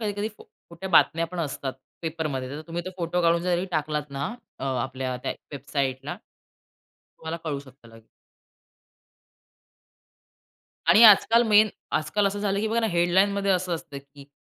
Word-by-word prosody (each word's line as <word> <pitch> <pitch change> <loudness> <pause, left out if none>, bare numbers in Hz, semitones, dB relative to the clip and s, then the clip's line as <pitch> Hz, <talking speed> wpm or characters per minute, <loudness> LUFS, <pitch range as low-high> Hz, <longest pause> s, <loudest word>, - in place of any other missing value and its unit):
कधी-कधी 205 0 -2
फो - - -15 0.3
खोट्या 180 +3 -7
बातम्या 165 -2 +4
पण 180 +1 -8
असतात 135 -3 -3 0.3
पेपरमध्ये. 155 -5 -3
तर 145 +2 -6
तुम्ही 170 +1 -4
तो - - -3
फोटो 175 0 -1
काढून 170 0 +3
जरी 180 0 0
टाकलात 150 -1 -2
ना, 140 0 -3 0.3
अ, - - -5
आपल्या 130 0 -2
त्या - - -2 0.2
वेबसाईटला. 140 0 -3 1.0
तुम्हाला 160 +1 -5
कळू 150 -3 -2
शकतं 130 -3 -16
लगेच. 115 0 -16 2.8
आणि 220 - +7
आजकाल 225 +2 +7
मेन. 215 +1 +6 0.2
आजकाल 200 +6 +1
असं 200 +1 -2
झालं, 200 -1 0
की 220 - -1
बघा 230 +1 +1
ना, 225 - +1
हेडलाईनमध्ये 190 +3 +2
असं 180 -1 +1
असतं, 160 -4 -7
की 140 0 -16
165 Hz, 150 wpm, -25 LUFS, 140-195 Hz, 2.8 s, आणि